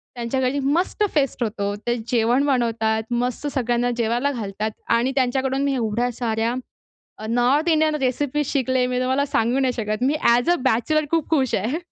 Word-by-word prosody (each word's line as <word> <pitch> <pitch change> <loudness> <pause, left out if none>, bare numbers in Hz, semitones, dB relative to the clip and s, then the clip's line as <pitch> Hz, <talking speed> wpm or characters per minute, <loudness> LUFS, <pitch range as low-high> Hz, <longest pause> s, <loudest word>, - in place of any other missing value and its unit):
त्यांच्या 240 +2 -2
घरी 260 +3 0
मस्त 330 +9 0
फेस्ट 275 -4 +1
होतो. 205 -2 -2
ते 240 +3 -2
जेवण 245 +4 +2
बनवतात, 225 -4 +1
मस्त 245 +4 -1
सगळ्यांना 245 -1 +1
जेवायला 240 +5 0
घालतात 215 -2 -3 0.2
आणि 245 +3 +1
त्यांच्याकडून 265 +1 0
मी 280 -1 +1
एवढ्या 235 +1 -1
साऱ्या 230 0 -1 0.7
अ, - - -5
नॉर्थ 260 +8 +2
इंडियन 310 -1 +3
रेसिपीज 285 +2 0
शिकले 260 -2 +1
मी 250 0 -1
तुम्हाला 260 +3 +1
सांगू 250 -1 +1
नाही 260 -2 +1
शकत. 215 0 -3
मी 285 - +2
ॲज 240 +7 +4
अ, - - +4
बॅचलर 295 +6 +2
खूप 330 -2 0
खुश 265 -6 +2
आहे. 235 +11 -1
250 Hz, 170 wpm, -22 LUFS, 230-275 Hz, 0.7 s, ॲज